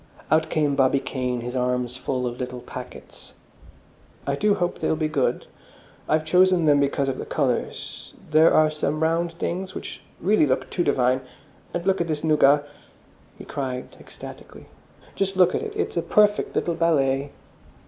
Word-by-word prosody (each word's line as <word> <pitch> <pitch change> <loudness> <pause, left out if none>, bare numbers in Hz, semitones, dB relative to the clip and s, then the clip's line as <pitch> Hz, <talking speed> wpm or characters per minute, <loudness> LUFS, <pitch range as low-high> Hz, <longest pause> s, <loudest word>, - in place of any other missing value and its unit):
Out 160 0 +3
came 150 -2 +1
Bobby 135 0 +3
Kane, 125 -2 -3
his 125 +2 -5
arms 125 -1 -1
full 130 0 -2
of 120 0 -4
little 125 -1 -5
packets. - - -11 0.9
"I 140 - 0
do 205 +8 +2
hope 175 -2 -2
they'll - - +1
be 155 0 0
good. 145 -4 0 0.6
I've 155 0 +2
chosen 180 +1 +4
them 145 -2 +5
because 140 0 +1
of 130 -1 -2
the - - -5
colours. 130 -5 -3 0.2
There 155 +2 +6
are 155 0 +4
some 155 0 -2
round 165 +1 +1
things 185 +2 -4
which - - -7 0.2
really 190 -3 +3
look 130 0 0
too 175 - 0
divine. 130 -2 +2 0.5
And 175 - -3
just - - -15
look 195 -2 +2
at 170 - -1
this 155 -2 -3
nougat," 145 -2 +4 0.7
he - - -10
cried 130 -2 -5
ecstatically, - - -12 0.5
"just 195 -1 -2
look 180 -1 +5
at - - -1
it! 435 -1 -5
It's 430 - -2
a - - +2
perfect 210 0 +2
little 170 - 0
ballet!" 145 -5 +1
150 Hz, 170 wpm, -24 LUFS, 130-170 Hz, 0.9 s, There